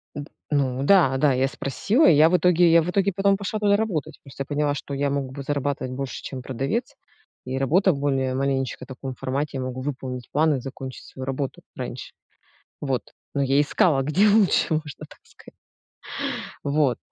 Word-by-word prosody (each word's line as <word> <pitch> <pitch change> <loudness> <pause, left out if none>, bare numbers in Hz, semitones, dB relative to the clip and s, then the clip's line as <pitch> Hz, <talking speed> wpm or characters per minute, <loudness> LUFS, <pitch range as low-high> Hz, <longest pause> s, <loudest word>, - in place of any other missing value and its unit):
Н 145 - -4
д - - -15 0.2
Ну 135 -3 0
да, 150 -7 +5
да, 140 0 +3
я 130 +1 +2
спросила 200 - +1
и - - +7
я 155 +2 +6
в 180 - +4
итоге, 175 0 +4
я 165 0 +6
в 165 - -3
итоге 200 +2 +1
потом 195 +1 +2
пошла 205 +2 -3
туда 205 -1 +3
работать. 205 -9 -2
Просто 135 0 -10
я 140 - -1
поняла, 145 0 0
что 140 0 -6
я 140 0 0
мог 140 -2 -2
бы 140 0 -7
зарабатывать 140 -2 -2
больше, 135 0 -5
чем 130 -2 -6
продавец, 175 - -3 0.5
и 130 +1 -3
работа 175 +7 +3
в 140 - -5
более 135 -2 0
маленечко 135 -1 -1
таком 130 0 -7
формате. 140 +3 -3
Я - - -3
могу 130 0 -4
выполнить 130 -3 -5
план 155 0 +3
и - - -2
закончить 130 0 -8
свою 130 - -8
работу 135 0 -4
раньше. - - -6 0.7
Вот. 135 -3 -3 0.2
Но 140 - +1
я 135 +1 +3
искала 145 -1 +2
где 170 +10 +3
лучше, 200 -5 +3
можно 150 -3 -4
так - - -16
сказать. - - -18 1.0
Вот. 140 -4 +1
140 Hz, 195 wpm, -24 LUFS, 135-165 Hz, 1.0 s, и